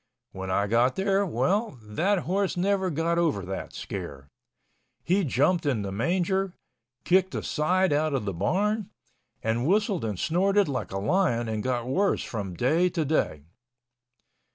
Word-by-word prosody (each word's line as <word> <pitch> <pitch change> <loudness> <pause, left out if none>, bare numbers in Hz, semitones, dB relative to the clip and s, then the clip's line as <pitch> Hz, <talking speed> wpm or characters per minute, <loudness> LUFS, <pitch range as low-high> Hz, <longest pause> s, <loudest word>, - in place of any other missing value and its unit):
When 95 0 -6
I 100 +2 +1
got 120 +5 +2
there—well, 195 - 0
that 170 - 0
horse 190 +1 0
never 190 +1 +1
got 165 +2 0
over 130 - 0
that 95 +1 -5
scare. 70 0 -7 0.7
He 190 +3 +2
jumped 165 +5 +2
in 130 -8 0
the 100 - -4
manger, 180 - 0 0.5
kicked 185 +1 +3
the - - -3
side 185 +3 +1
out 150 0 +1
of 125 - -2
the 100 - -2
barn, 210 - 0 0.5
and 115 +4 0
whistled 205 - +1
and 105 -4 -2
snorted 195 - +2
like 125 -8 -3
a 95 - -3
lion 120 - +1
and 110 -1 -2
got 120 0 -1
worse 190 +11 +1
from 100 -6 -5
day 160 - +2
to 165 -3 -1
day. 135 - 0
155 Hz, 155 wpm, -27 LUFS, 115-190 Hz, 0.7 s, kicked